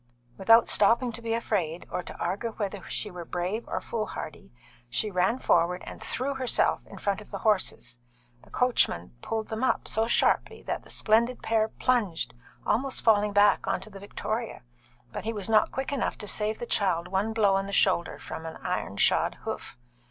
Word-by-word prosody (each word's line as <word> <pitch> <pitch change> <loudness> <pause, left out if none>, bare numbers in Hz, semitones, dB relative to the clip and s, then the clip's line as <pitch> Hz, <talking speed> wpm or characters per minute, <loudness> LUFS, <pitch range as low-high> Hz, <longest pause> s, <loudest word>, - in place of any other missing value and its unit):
Without 225 - +6
stopping 235 +4 +4
to 230 +1 -7
be 230 0 -1
afraid, 180 -8 -1
or - - -1
to - - -10
argue 205 +6 -2
whether 205 -2 -4
she 210 - -2
were 180 -1 -7
brave 180 +7 -3
or - - -2
foolhardy, 215 - -5 0.4
she 210 - 0
ran 190 +6 +2
forward 180 -5 +2
and - - -9
threw 260 +4 -2
herself 260 -2 +1
in - - -11
front 200 0 -1
of 210 - -13
the 200 - -5
horses. 185 - 0 0.4
The - - -19
coachman 235 - +1
pulled 220 -1 -3
them 220 +3 -3
up 260 - +1
so 220 +1 +1
sharply - - +2
that - - -3
the - - -18
splendid 235 +3 +2
pair 220 -1 +2
plunged, 220 -8 0 0.3
almost 265 +2 0
falling 210 -2 +4
back 205 0 +4
on - - +1
to 215 - -11
the 195 - -10
victoria, 215 - -4 0.5
but - - -5
he 225 +2 -2
was 205 -3 -3
not 215 - +5
quick 265 +1 -3
enough 270 - -1
to 210 - -7
save 215 +1 0
the - - -5
child 180 -6 0
one 195 +4 0
blow 215 -3 +3
on 195 0 0
the - - -5
shoulder 185 -3 +2
from 160 - -7
an 160 - -7
iron - - -2
shod - - +3
hoof. - - -5
210 Hz, 190 wpm, -28 LUFS, 190-230 Hz, 0.5 s, Without